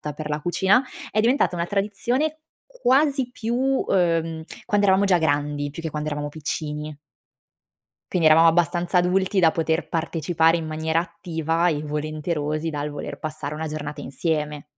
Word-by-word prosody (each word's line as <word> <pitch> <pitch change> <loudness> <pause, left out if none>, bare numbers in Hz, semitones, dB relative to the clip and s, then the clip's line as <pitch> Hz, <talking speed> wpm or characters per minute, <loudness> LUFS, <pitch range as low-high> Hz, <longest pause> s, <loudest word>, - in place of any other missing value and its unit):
per 150 -1 -6
la 150 0 -1
cucina; 190 - +3 0.3
è 215 - 0
diventata 235 -4 +2
una 170 0 -1
tradizione 240 - -1 0.3
quasi 275 - +2
più, 235 -1 -3
uhm, 170 -11 +1 0.2
quando 205 -2 +2
eravamo 195 +1 +4
già 185 -2 +4
grandi, 145 -2 0
più 165 - -7
che 160 - -3
quando 150 0 -3
eravamo 145 0 -3
piccini. 150 0 -4 1.2
Quindi 170 -3 +3
eravamo 165 +1 +7
abbastanza 175 +2 +1
adulti 185 +2 +2
da 165 -3 +5
poter 165 +1 -1
partecipare 165 0 +1
in 165 - -4
maniera 160 +1 0
attiva 170 -1 -1
e 150 -2 0
volenterosi 155 +1 -2
dal 150 0 -3
voler 145 -1 -6
passare 155 -2 -5
una 160 +1 -4
giornata 150 -1 -5
insieme. 150 0 -2
165 Hz, 150 wpm, -23 LUFS, 150-190 Hz, 1.2 s, eravamo